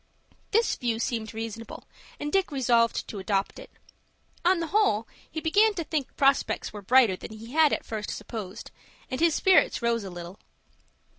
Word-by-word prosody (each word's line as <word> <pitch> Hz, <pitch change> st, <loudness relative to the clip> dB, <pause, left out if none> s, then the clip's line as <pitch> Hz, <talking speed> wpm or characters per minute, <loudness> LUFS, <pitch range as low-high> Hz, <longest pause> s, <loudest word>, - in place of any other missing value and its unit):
This 455 Hz, +2 st, +2 dB
view 235 Hz, -2 st, -1 dB
seemed 225 Hz, -2 st, -2 dB
reasonable, 225 Hz, 0 st, -7 dB, 0.4 s
and 295 Hz, 0 st, -4 dB
Dick 385 Hz, -4 st, +2 dB
resolved 235 Hz, -4 st, +2 dB
to 205 Hz, -, -6 dB
adopt 195 Hz, 0 st, -1 dB
it. -, -, -11 dB, 0.7 s
On 360 Hz, 0 st, +3 dB
the 335 Hz, -, -1 dB
whole, 230 Hz, -, +2 dB, 0.2 s
he 315 Hz, -, -4 dB
began 410 Hz, +7 st, +3 dB
to 340 Hz, -, -2 dB
think 295 Hz, -3 st, -3 dB
prospects 275 Hz, -6 st, +2 dB
were 205 Hz, -, -7 dB
brighter 230 Hz, -1 st, +4 dB
than 220 Hz, -, -9 dB
he 225 Hz, +2 st, -10 dB
had 310 Hz, 0 st, +4 dB
at -, -, -2 dB
first 215 Hz, -2 st, -5 dB
supposed, 215 Hz, -2 st, -7 dB, 0.4 s
and 255 Hz, -, -2 dB
his 335 Hz, -2 st, +4 dB
spirits 375 Hz, -9 st, +3 dB
rose 235 Hz, -2 st, +1 dB
a 195 Hz, -, -6 dB
little. 175 Hz, +1 st, -9 dB
235 Hz, 170 wpm, -27 LUFS, 215-315 Hz, 0.7 s, brighter